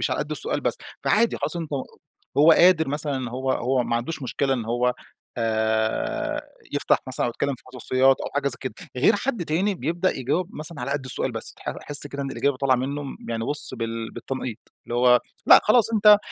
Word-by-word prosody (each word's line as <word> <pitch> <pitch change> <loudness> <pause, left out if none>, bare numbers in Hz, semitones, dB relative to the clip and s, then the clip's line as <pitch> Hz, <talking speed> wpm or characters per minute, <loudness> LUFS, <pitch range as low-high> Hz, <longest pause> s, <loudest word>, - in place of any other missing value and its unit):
مش - - 0
علي - - -1
قدّ - - -5
السؤال - - -1
بس. - - -1 0.3
فعادي 235 - +2
خلاص 175 - -3
أنت 165 -3 -5 0.7
هو 155 +3 +7
قادر 170 -3 +5
مثلًا 140 -4 -2
هو 130 +1 -1
هو 130 +1 0
ما 115 -1 -1
عندوش 140 +6 -4
مشكلة 135 +1 0
إن 120 -4 -3
هو 120 +2 0 0.4
آآ، 110 - -1 0.3
يفتح - - +2
مثلًا - - 0
أو 120 - -1
يتكلم 140 +3 -2
في - - -16
خصوصيات 130 +1 +2
أو - - -4
حاجة 145 -1 +1
زي 130 - +1
كده. 130 -5 -5 0.2
غير 130 - +4
حد 230 -4 -2
تاني 185 +6 0
بيبدأ 170 +5 -1
يجاوب 145 +8 -1
مثلًا 150 -1 -5
على 130 +3 -3
قدّ 140 -1 -2
السؤال 130 - -1
بس، - - -4
أح - - -3
أحس 145 0 +6
كده 140 0 -5
إن 135 - -4
الإجابة 140 -1 0
طالعة 130 -1 +2
منه 140 +3 -3 0.3
يعني 115 -1 -2
بُص 145 0 0
بال 115 -1 -4
بالتنقيط، 130 -4 -5 0.3
اللي 120 - -4
هو 125 0 +5 0.3
لأ - - +9
خلاص 230 +1 +4
أنت 210 -1 +7
135 Hz, 200 wpm, -24 LUFS, 120-155 Hz, 0.7 s, لأ